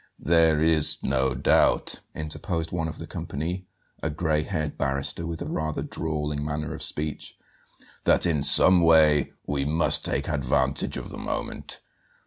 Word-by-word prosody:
"There 80 -1 +2
is 80 -1 +3
no 65 -1 0
doubt," 65 - +1 0.2
interposed 80 +2 -4
one 80 -2 -2
of 80 - -7
the - - -8
company, 90 +5 -6 0.3
a 80 - -2
gray 80 0 -1
haired 75 -4 -4
barrister 70 +4 -1
with 85 -1 -5
a - - -6
rather 80 0 -3
drawling 75 -2 -4
manner 75 0 -4
of 80 - -8
speech, 75 -1 -2 0.7
"that - - +5
in 80 -5 0
some 90 +5 +7
way 80 -3 +4
we 70 -1 -2
must 80 +4 +3
take - - -2
advantage 65 -1 -1
of - - -7
the - - -9
moment. - - -6
75 Hz, 150 wpm, -25 LUFS, 75-80 Hz, 0.7 s, some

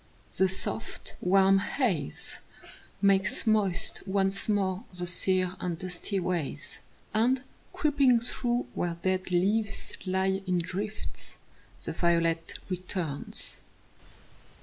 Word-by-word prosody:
The 190 0 +4
soft, 190 +4 -3
warm 195 +1 +5
haze 195 - -1 0.6
Makes 195 -1 +3
moist 205 -4 +2
once 195 +1 +1
more 195 -1 +1
the 180 -1 -3
sere 185 +1 +1
and 175 -2 -2
dusty 185 +3 -3
ways, 170 -5 -3 0.3
And, 250 +4 +3 0.3
creeping 290 -8 +4
through 240 +1 0
where 170 -1 -1
dead 185 0 +1
leaves 200 +3 +1
lie 190 +1 +1
in 180 -1 +2
drifts, 200 +5 -5 0.5
The - - -3
violet 165 -1 +1
returns. 180 -5 -4
190 Hz, 105 wpm, -29 LUFS, 180-210 Hz, 0.6 s, warm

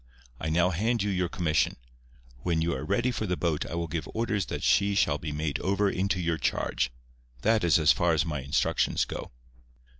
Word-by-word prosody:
I 80 - -2
now 85 +3 +3
hand 110 +5 0
you 105 - 0
your 90 -2 0
commission. 75 -6 +1 0.6
When 80 +5 0
you 85 - 0
are 65 +1 -4
ready 120 +11 +1
for 110 -3 -3
the 90 -1 -1
boat 80 -4 -1
I - - -5
will 85 0 -1
give 80 -1 -4
orders 110 -3 0
that - - -4
she 100 0 +3
shall 75 -6 +2
be 75 - -4
made 75 0 -2
over 100 +1 +1
into 95 0 0
your 85 -2 -1
charge. 65 -2 0 0.5
That 110 -1 +3
is 85 -3 +5
as 80 -1 +5
far 85 -1 +2
as 75 -1 +2
my 75 -4 -3
instructions 70 +2 +1
go." - - -6
85 Hz, 205 wpm, -28 LUFS, 80-100 Hz, 0.6 s, is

